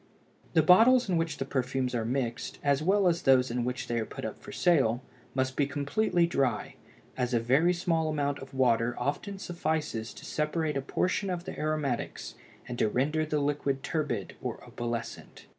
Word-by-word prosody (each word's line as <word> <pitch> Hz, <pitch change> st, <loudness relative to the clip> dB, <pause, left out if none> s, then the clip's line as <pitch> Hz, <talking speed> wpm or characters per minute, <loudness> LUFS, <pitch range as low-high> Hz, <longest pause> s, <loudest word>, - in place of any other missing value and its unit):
The 160 Hz, -, +5 dB
bottles 230 Hz, +9 st, +6 dB
in 185 Hz, -, +1 dB
which 165 Hz, -2 st, -1 dB
the 135 Hz, -, -2 dB
perfumes 130 Hz, -1 st, -1 dB
are 115 Hz, -2 st, -1 dB
mixed, 120 Hz, -1 st, -2 dB
as 140 Hz, 0 st, +2 dB
well 190 Hz, +3 st, +3 dB
as 170 Hz, -1 st, +2 dB
those 130 Hz, -2 st, +4 dB
in 120 Hz, 0 st, -1 dB
which 125 Hz, +2 st, -3 dB
they 120 Hz, 0 st, -1 dB
are 110 Hz, -, -2 dB
put -, -, -7 dB
up -, -, -5 dB
for -, -, -10 dB
sale, 135 Hz, -8 st, +2 dB, 0.3 s
must 130 Hz, 0 st, 0 dB
be 145 Hz, -, +2 dB
perfectly 170 Hz, +6 st, +1 dB
dry, 135 Hz, -9 st, 0 dB, 0.4 s
as 125 Hz, -1 st, 0 dB
a -, -, +4 dB
very 135 Hz, +9 st, +3 dB
small 170 Hz, -3 st, 0 dB
amount 145 Hz, -2 st, -1 dB
of 135 Hz, -, -10 dB
water 120 Hz, -3 st, +2 dB
often 145 Hz, +10 st, -2 dB
suffices 155 Hz, -10 st, -2 dB
to -, -, -11 dB
separate 150 Hz, 0 st, -1 dB
a 135 Hz, -, 0 dB
portion 185 Hz, +7 st, -1 dB
of 175 Hz, -1 st, -3 dB
the -, -, -6 dB
aromatics 150 Hz, -5 st, -2 dB, 0.3 s
and 120 Hz, -, -5 dB
to 110 Hz, -, +3 dB
render 150 Hz, +7 st, 0 dB
the 150 Hz, -, 0 dB
liquid 140 Hz, -1 st, -1 dB
turbid 130 Hz, -, -2 dB
or -, -, -5 dB
opalescent. 120 Hz, -1 st, -5 dB
140 Hz, 185 wpm, -29 LUFS, 125-165 Hz, 0.4 s, bottles